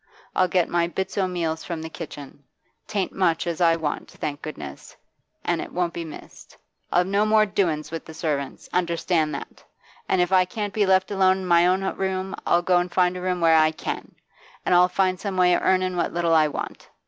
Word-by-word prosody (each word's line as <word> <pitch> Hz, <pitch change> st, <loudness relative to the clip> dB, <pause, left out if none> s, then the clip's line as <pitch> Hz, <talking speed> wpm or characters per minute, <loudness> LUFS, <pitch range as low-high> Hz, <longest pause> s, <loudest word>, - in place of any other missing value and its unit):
I'll 185 Hz, -, +3 dB
get 180 Hz, -1 st, +2 dB
my 170 Hz, -1 st, +1 dB
bits 190 Hz, +2 st, -4 dB
o' 195 Hz, -2 st, +1 dB
meals 165 Hz, -3 st, -2 dB
from 165 Hz, -2 st, -5 dB
the -, -, -4 dB
kitchen. 145 Hz, -3 st, -9 dB, 0.4 s
'Tain't 200 Hz, -3 st, -1 dB
much 170 Hz, -4 st, +1 dB
as 170 Hz, 0 st, -3 dB
I 165 Hz, -1 st, +5 dB
want, 160 Hz, -3 st, -3 dB
thank 145 Hz, -1 st, -5 dB
goodness, 70 Hz, -, -8 dB, 0.5 s
an' -, -, 0 dB
it -, -, -7 dB
won't 175 Hz, -1 st, -1 dB
be 170 Hz, -, -4 dB
missed. 160 Hz, -2 st, -12 dB, 0.3 s
I'll 175 Hz, -, +4 dB
have 180 Hz, -, -3 dB
no 200 Hz, +2 st, +2 dB
more 215 Hz, 0 st, +4 dB
doin's 170 Hz, -8 st, -1 dB
with 165 Hz, -1 st, -6 dB
servants, 145 Hz, -4 st, -3 dB
understand 170 Hz, -2 st, 0 dB
that; -, -, -9 dB, 0.5 s
an' 190 Hz, -, +2 dB
if 180 Hz, +1 st, +2 dB
I 185 Hz, -1 st, +6 dB
can't 205 Hz, +2 st, -4 dB
be 210 Hz, -2 st, +2 dB
left 190 Hz, +1 st, +3 dB
alone 190 Hz, -1 st, +3 dB
i' -, -, -6 dB
my 175 Hz, -1 st, +4 dB
own 185 Hz, +1 st, +2 dB
room, 190 Hz, 0 st, -2 dB
I'll 175 Hz, 0 st, +3 dB
go 180 Hz, 0 st, +3 dB
an' 175 Hz, 0 st, -2 dB
find 180 Hz, 0 st, +2 dB
a 180 Hz, -, -5 dB
room 180 Hz, -1 st, -1 dB
where 165 Hz, -1 st, +5 dB
I 155 Hz, 0 st, +5 dB
can, 155 Hz, -, -6 dB, 0.5 s
an' -, -, +2 dB
I'll 180 Hz, +1 st, +6 dB
find 185 Hz, 0 st, +1 dB
some 195 Hz, -3 st, -4 dB
way 180 Hz, -1 st, +5 dB
of -, -, +2 dB
earnin' 185 Hz, -1 st, +2 dB
what 170 Hz, -, -1 dB
little 170 Hz, -1 st, +2 dB
I 155 Hz, -1 st, +5 dB
want. 150 Hz, -, -6 dB
180 Hz, 215 wpm, -24 LUFS, 165-185 Hz, 0.5 s, I